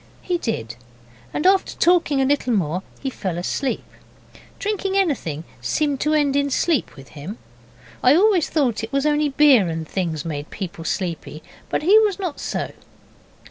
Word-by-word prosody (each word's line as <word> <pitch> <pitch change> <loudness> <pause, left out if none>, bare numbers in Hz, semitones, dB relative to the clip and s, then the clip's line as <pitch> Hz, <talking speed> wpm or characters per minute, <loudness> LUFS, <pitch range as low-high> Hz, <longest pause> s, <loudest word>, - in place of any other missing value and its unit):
He 355 -2 -1
did, 115 - -3 0.5
and 300 - -3
after 380 0 +3
talking 335 -5 +3
a 265 - +3
little 270 -3 +1
more 180 -3 0 0.2
he 270 - -3
fell 185 -8 -4
asleep. 250 +9 -2 0.7
Drinking 400 -1 -1
anything 245 - 0 0.2
seemed 285 - 0
to 305 +2 +1
end 285 -2 +2
in 285 0 +2
sleep 295 - 0
with 135 -1 -13
him. 155 +9 -8 0.6
I 255 +3 +6
always 380 -2 +4
thought 255 -8 0
it 225 - -5
was 275 +1 0
only 300 0 +2
beer 270 -8 +5
and 160 -1 -4
things 165 -5 -2
made 150 -2 -4
people 175 -4 -6
sleepy, 165 -5 -3 0.3
but - - -1
he 405 +7 +7
was 420 -4 +2
not 360 -7 -4
so. - - -3
270 Hz, 165 wpm, -22 LUFS, -, 0.7 s, he